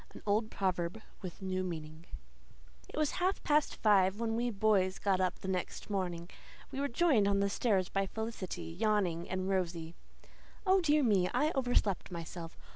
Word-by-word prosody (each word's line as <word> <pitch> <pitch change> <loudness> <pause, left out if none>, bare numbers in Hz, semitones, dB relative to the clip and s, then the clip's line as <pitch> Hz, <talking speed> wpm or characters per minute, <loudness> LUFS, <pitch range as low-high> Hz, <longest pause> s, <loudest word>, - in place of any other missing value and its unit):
AN - - -11
OLD 215 +2 +1
PROVERB 185 +1 -2 0.2
WITH 185 0 -7
A - - -4
NEW 185 0 -1
MEANING 160 -2 -6 0.8
It - - -9
was 305 -2 +2
half 375 +2 +1
past 300 0 +2
five 200 -2 +3
when 225 -1 0
we 240 +1 0
boys 195 -3 +2
got 190 -2 +1
up 185 - 0
the - - -8
next 190 +3 -3
morning. 175 -4 -2 0.4
We 265 - -4
were 285 - +1
joined 255 -6 +3
on 200 0 +2
the 200 0 +1
stairs 195 -6 +1
by 195 0 -1
Felicity, 220 -3 -5
yawning 180 -2 0
and 185 0 -2
rosy. 170 -4 -1 0.7
"Oh, 380 0 +5
dear 300 -3 +3
me, 195 -6 +3
I 305 +1 +3
overslept 245 - +1
myself. 170 -1 -7
195 Hz, 175 wpm, -33 LUFS, 180-225 Hz, 0.8 s, Oh